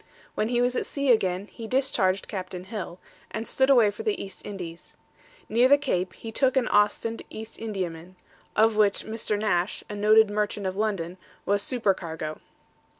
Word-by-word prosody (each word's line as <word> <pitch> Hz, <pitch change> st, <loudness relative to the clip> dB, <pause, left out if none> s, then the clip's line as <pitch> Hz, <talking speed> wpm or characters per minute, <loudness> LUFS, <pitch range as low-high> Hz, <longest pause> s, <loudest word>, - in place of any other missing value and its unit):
When 215 Hz, -, 0 dB
he 240 Hz, +1 st, +2 dB
was 250 Hz, 0 st, +1 dB
at -, -, -1 dB
sea 280 Hz, -2 st, +1 dB
again, 190 Hz, -4 st, +2 dB
he 225 Hz, +1 st, -9 dB
discharged 210 Hz, -8 st, +1 dB
Captain 185 Hz, -3 st, -5 dB
Hill, 185 Hz, -3 st, -6 dB, 0.3 s
and 220 Hz, +1 st, -5 dB
stood 265 Hz, 0 st, +2 dB
away 235 Hz, -6 st, +6 dB
for -, -, -8 dB
the 430 Hz, -2 st, -1 dB
East 195 Hz, -, -8 dB
Indies. 175 Hz, -4 st, -8 dB, 0.5 s
Near 240 Hz, +3 st, +4 dB
the 285 Hz, +2 st, +7 dB
Cape 185 Hz, -10 st, -1 dB
he 225 Hz, -, -8 dB
took 265 Hz, +3 st, +2 dB
an 255 Hz, -, +2 dB
Ostend 210 Hz, +2 st, +2 dB
East 220 Hz, 0 st, -8 dB
Indiaman, 185 Hz, -5 st, -5 dB, 0.4 s
of 220 Hz, 0 st, +4 dB
which 210 Hz, -2 st, +2 dB
Mr. 220 Hz, -1 st, -1 dB
Nash, 205 Hz, -3 st, 0 dB
a -, -, -4 dB
noted 215 Hz, +1 st, +5 dB
merchant 210 Hz, -1 st, -1 dB
of 185 Hz, 0 st, -2 dB
London, 190 Hz, -4 st, -2 dB, 0.3 s
was 200 Hz, 0 st, +2 dB
supercargo. 170 Hz, -, -1 dB
210 Hz, 170 wpm, -26 LUFS, 185-230 Hz, 0.5 s, the